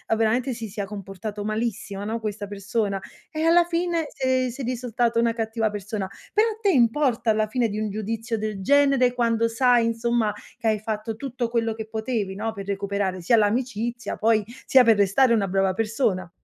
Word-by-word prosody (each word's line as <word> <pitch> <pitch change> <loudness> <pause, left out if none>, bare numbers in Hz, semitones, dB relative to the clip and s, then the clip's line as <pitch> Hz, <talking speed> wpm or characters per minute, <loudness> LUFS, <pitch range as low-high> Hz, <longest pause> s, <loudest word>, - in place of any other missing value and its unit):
veramente, 235 +4 +1
si 225 -2 -6
sia 200 0 -4
comportato 205 +1 -6
malissimo, 215 -2 -3
no, 225 +2 -2
questa 210 -2 -4
persona; 200 0 -2 0.3
e 310 0 -3
alla 335 +1 +5
fine 340 -1 -1
sei 260 -1 +1
sei 255 0 -6
risultata 240 -1 -1
una 230 0 +3
cattiva 225 -1 -1
persona. 205 -1 -4 0.3
Però 430 +2 +4
a 440 0 -7
te 410 - +3
importa 240 - +3
alla 215 0 +1
fine 235 +1 0
di 210 +1 -3
un 215 - -1
giudizio 225 +2 -3
del 215 -2 -4
genere, 275 +1 +4
quando 230 -2 +1
sai, 240 0 +3
insomma, 230 -1 +1 0.3
che 225 - -3
hai 215 -1 +2
fatto 215 +1 -4
tutto 245 -1 -3
quello 230 -1 0
che 220 -1 -7
potevi, 220 -3 -3
no, 220 +2 -2
per 200 -2 -7
recuperare 200 -2 -2
sia 230 +7 +4
l'amicizia, 235 +2 -1
poi 220 -1 +3 0.2
sia 260 -1 +6
per 225 -3 +5
restare 205 +6 +4
una 205 -4 +2
brava 195 0 +1
persona. 210 -4 -1
225 Hz, 185 wpm, -24 LUFS, 210-245 Hz, 0.3 s, sia